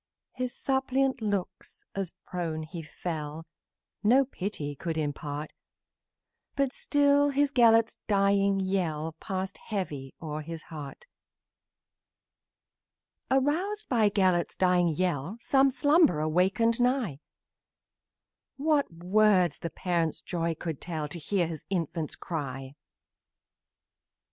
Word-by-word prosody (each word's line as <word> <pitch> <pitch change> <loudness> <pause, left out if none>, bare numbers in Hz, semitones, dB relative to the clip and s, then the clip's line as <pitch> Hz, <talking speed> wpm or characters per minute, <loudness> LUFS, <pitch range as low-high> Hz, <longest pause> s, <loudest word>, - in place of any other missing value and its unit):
His 255 -1 -2
suppliant, 265 -1 0
as 195 -2 -4
to - - -34 0.2
earth 160 -3 -3
he 170 - -5
fell, 155 0 -5 0.6
No 255 +6 +5
pity 185 - -4
could 165 +2 -3
impart, 150 0 -3 1.0
But 275 -2 +1
still 285 0 +3
his 285 0 +2
Gelert's 230 -3 +5
dying 200 -1 +3
yell 165 -5 -1
Passed 190 0 -4
heavy 150 -11 -4
o'er 155 -1 -4
his 165 +1 -7
heart. 150 - -8 2.2
Aroused 345 +11 +1
by 225 -5 +4
Gelert's 185 -4 +2
dying 180 -1 +3
yell, 170 +2 -1
Some 270 +3 +4
slumberer 285 - +3
wakened 195 +8 +2
nigh; 245 - +1 1.4
What 290 - +2
words 180 -1 +3
the 170 - -4
parent's 170 -3 -1
joy 170 -2 -1
can 160 -2 -4
tell 155 -2 -4
To 170 - -5
hear 180 +3 0
his 160 -2 -6
infant 165 -4 -2
cry! 135 -5 -5
185 Hz, 105 wpm, -28 LUFS, 160-240 Hz, 2.2 s, No